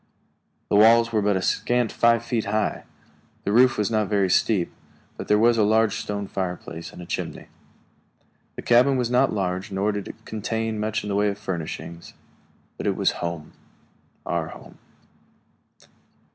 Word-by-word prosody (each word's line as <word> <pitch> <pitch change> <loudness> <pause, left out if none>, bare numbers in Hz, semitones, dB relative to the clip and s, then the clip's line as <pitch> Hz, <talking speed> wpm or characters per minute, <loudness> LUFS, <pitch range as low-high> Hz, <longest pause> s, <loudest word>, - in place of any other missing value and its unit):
The - - +2
walls 115 +2 +6
were 110 -2 +1
but 100 -1 +2
a 95 - -3
scant 120 +1 +1
five 115 0 +2
feet 115 -2 -1
high; 105 +1 -1 0.6
the 100 - -1
roof 125 +4 +5
was 105 +1 0
not 110 -2 +1
very 100 -3 +1
steep; 95 -2 +2 0.5
and - - -6
there 105 - +4
was 115 +1 +4
a - - +5
large 110 0 +2
stone 100 -1 -4
fireplace 90 -3 -5
and 90 - -10
a - - -10
chimney. - - -5 1.1
The - - -7
cabin 125 +3 +4
was 125 -1 -1
not 125 +2 +3
large 95 -1 -2
nor 100 +2 0
did 100 -1 -5
it - - -11
contain 110 0 -3
much 110 0 -2
in 105 - -5
the 100 - -1
way 105 +1 +2
of 100 - -4
furnishings; 85 -3 -6 0.6
but - - -4
it - - +1
was - - +2
home 85 -3 -5 0.7
our 85 -2 -1
home. - - -13
105 Hz, 170 wpm, -24 LUFS, 95-115 Hz, 1.1 s, walls